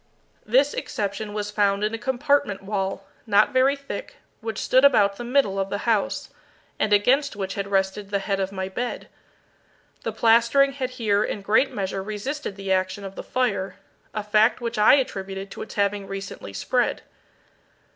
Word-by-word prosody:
This 265 +6 +3
exception 205 +1 -3
was 210 0 -3
found 200 -1 +1
in 215 +1 0
a - - -1
compartment 265 -6 0
wall, 195 -1 -3 0.2
not 210 +6 +4
very 260 +2 +4
thick, 280 - -7 0.2
which 225 0 -5
stood 260 +1 +3
about 205 -8 +5
the - - -5
middle 240 -6 +1
of 195 0 -1
the 200 - -2
house, 225 -4 0 0.5
and 215 - +1
against 255 +7 +3
which 195 -1 -3
had 200 0 -3
rested 195 +1 -1
the 200 - +1
head 195 0 -2
of 190 0 -1
my 190 -1 -3
bed. 240 +6 -4 0.9
The - - -3
plastering 235 +5 +4
had 265 -2 -3
here 215 -5 +1
in 205 - -4
great 220 +7 +3
measure 195 -4 -3
resisted 215 +5 -4
the 195 -1 -4
action 185 +1 0
of 195 -1 -7
the - - -7
fire, 200 -7 -1 0.4
a 215 - -4
fact 215 +3 +3
which 235 -2 -3
I 210 - +7
attributed 195 -7 -3
to - - -8
its - - -8
having 200 -1 0
recently 195 - -7
spread. - - 0
210 Hz, 175 wpm, -24 LUFS, 195-245 Hz, 0.9 s, I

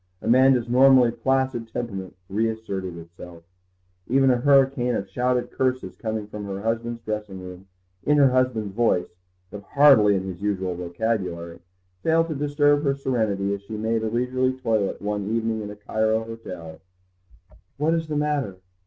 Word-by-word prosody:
Amanda's 125 +1 +4
normally 130 0 +6
placid 130 0 -1
temperament 100 -5 -5
reasserted 100 -4 -3
itself. 85 0 -12 0.6
Even 135 +1 +4
a 125 - +3
hurricane 135 -2 +3
of 100 - -3
shouted 125 +5 -1
curses, 130 -8 -1
coming 110 +1 -4
from 105 0 -7
her 100 -1 -5
husband's 115 +1 -2
dressing 105 -3 -4
room, 90 +1 -10 0.4
in 150 0 +3
her 140 -3 +5
husband's 125 -6 0
voice, 115 -5 +1 0.4
but 105 - -8
hardly 115 -5 +5
in 95 - -1
his 95 -1 -7
usual 95 -3 -1
vocabulary, 90 -1 -3 0.4
failed 165 +1 +2
to - - -1
disturb 145 0 +2
her 140 -2 +1
serenity 110 -7 -1
as 100 - -5
she 105 +2 -7
made 110 +1 0
a 110 - -1
leisurely 130 +2 0
toilet 110 -5 0
one 105 -1 -2
evening 115 -1 -1
in 105 - -6
a 105 - -8
Cairo 110 +2 0
hotel. 90 -8 -9 1.0
"What 155 +3 +1
is 165 -1 -1
the 150 -1 -2
matter? 145 -9 -1
115 Hz, 155 wpm, -24 LUFS, 100-130 Hz, 1.0 s, normally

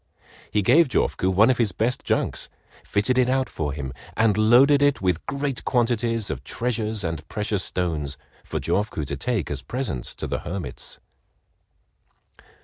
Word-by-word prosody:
He 105 - +1
gave 150 - +5
Jofuku 100 -5 +1
one 105 +7 +5
of 125 - -1
his 110 -6 +2
best 115 +7 -1
junks, - - -1 0.3
fitted 125 +5 +1
it 125 0 +3
out 130 0 +1
for 75 -2 -3
him, 70 -2 -5 0.2
and 110 -2 +4
loaded 125 +7 +5
it 145 -1 +3
with 90 -3 0
great 140 -2 -2
quantities 115 -3 +1
of - - -5
treasures 110 -3 -2
and 80 -2 -4
precious 105 -1 -1
stones 75 -6 -2 0.3
for - - -3
Jofuku 100 -6 -1
to 70 - -3
take 105 - -2
as 70 -1 -3
presents 75 - -4
to - - -5
the - - -2
hermits. 90 +2 -5
105 Hz, 155 wpm, -24 LUFS, 85-125 Hz, 0.3 s, gave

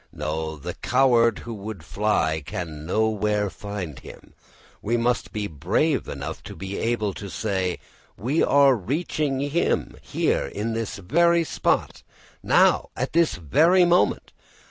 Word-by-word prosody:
No, 80 +1 -3
the 70 - -6
coward 120 -3 +3
who 120 - -5
would 100 -5 -7
fly 100 -7 0
can 80 0 -6
nowhere 105 0 +1
find 95 -9 -6
him. - - -13 0.5
We 120 +3 0
must 120 -2 0
be 105 -1 -3
brave 100 - 0
enough - - -6
to - - -8
be 95 +1 -5
able 110 -3 0
to 100 +1 -8
say: 95 -4 -2 0.4
We 135 +10 0
are 140 -1 +5
reaching 140 - -2
him 145 +4 0
here - - 0
in 105 +9 -3
this 115 -1 -3
very 170 - +3
spot, - - -1 0.4
now - - +3
at - - -2
this 170 0 +3
very 165 - +4
moment. 175 +1 +2
110 Hz, 140 wpm, -24 LUFS, 95-135 Hz, 0.5 s, are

